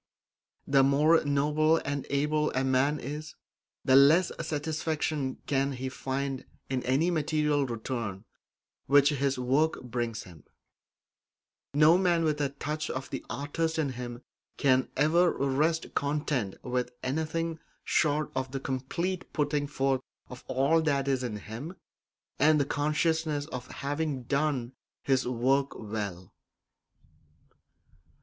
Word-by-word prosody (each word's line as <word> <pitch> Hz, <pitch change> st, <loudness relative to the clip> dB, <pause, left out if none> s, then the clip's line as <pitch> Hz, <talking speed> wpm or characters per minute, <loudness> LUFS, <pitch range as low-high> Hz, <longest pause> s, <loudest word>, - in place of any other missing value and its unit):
The 135 Hz, -1 st, +4 dB
more 150 Hz, +4 st, +4 dB
noble 150 Hz, +3 st, +3 dB
and 140 Hz, -1 st, -3 dB
able 150 Hz, +2 st, +1 dB
a 130 Hz, -, +1 dB
man 135 Hz, +3 st, +2 dB
is, 150 Hz, +3 st, -6 dB, 0.5 s
the 130 Hz, -, +5 dB
less 155 Hz, +6 st, +6 dB
satisfaction 155 Hz, -2 st, -2 dB
can 140 Hz, 0 st, +1 dB
he 130 Hz, +1 st, -4 dB
find 135 Hz, 0 st, -3 dB, 0.3 s
in 130 Hz, -1 st, 0 dB
any 145 Hz, +7 st, +2 dB
material 150 Hz, -3 st, +1 dB
return 115 Hz, -4 st, -4 dB, 0.6 s
which 145 Hz, +1 st, +6 dB
his 140 Hz, -2 st, 0 dB
work 135 Hz, +6 st, +1 dB
brings 120 Hz, -2 st, -3 dB
him; 85 Hz, -6 st, -14 dB, 1.3 s
no 155 Hz, +4 st, +6 dB
man 175 Hz, -3 st, +2 dB
with 150 Hz, -2 st, 0 dB
a 140 Hz, -, +1 dB
touch 150 Hz, +2 st, -4 dB
of 130 Hz, +1 st, -5 dB
the 135 Hz, -, -4 dB
artist 150 Hz, +7 st, -2 dB
in 155 Hz, -3 st, +1 dB
him 120 Hz, -1 st, -7 dB, 0.3 s
can 130 Hz, -2 st, +3 dB
ever 165 Hz, +5 st, +4 dB
rest 150 Hz, +5 st, 0 dB
content 140 Hz, -8 st, -1 dB
with 125 Hz, -1 st, -1 dB
anything 160 Hz, +4 st, -2 dB, 0.2 s
short 150 Hz, -1 st, +1 dB
of 130 Hz, 0 st, -2 dB
the 135 Hz, -, -2 dB
complete 140 Hz, +8 st, -3 dB
putting 145 Hz, -1 st, 0 dB
forth 135 Hz, -2 st, 0 dB, 0.3 s
of 125 Hz, 0 st, -10 dB
all 140 Hz, +5 st, +3 dB
that 140 Hz, -3 st, 0 dB
is 135 Hz, -2 st, +1 dB
in 120 Hz, -4 st, -3 dB
him, 115 Hz, -, -7 dB, 0.6 s
and 150 Hz, +2 st, +5 dB
the 140 Hz, -, +2 dB
consciousness 150 Hz, +1 st, 0 dB
of 125 Hz, -5 st, -7 dB
having 145 Hz, -1 st, -3 dB
done 140 Hz, -2 st, -1 dB, 0.3 s
his 130 Hz, -3 st, +1 dB
work 130 Hz, +3 st, +1 dB
well. 100 Hz, -5 st, -5 dB
140 Hz, 130 wpm, -29 LUFS, 130-155 Hz, 1.3 s, less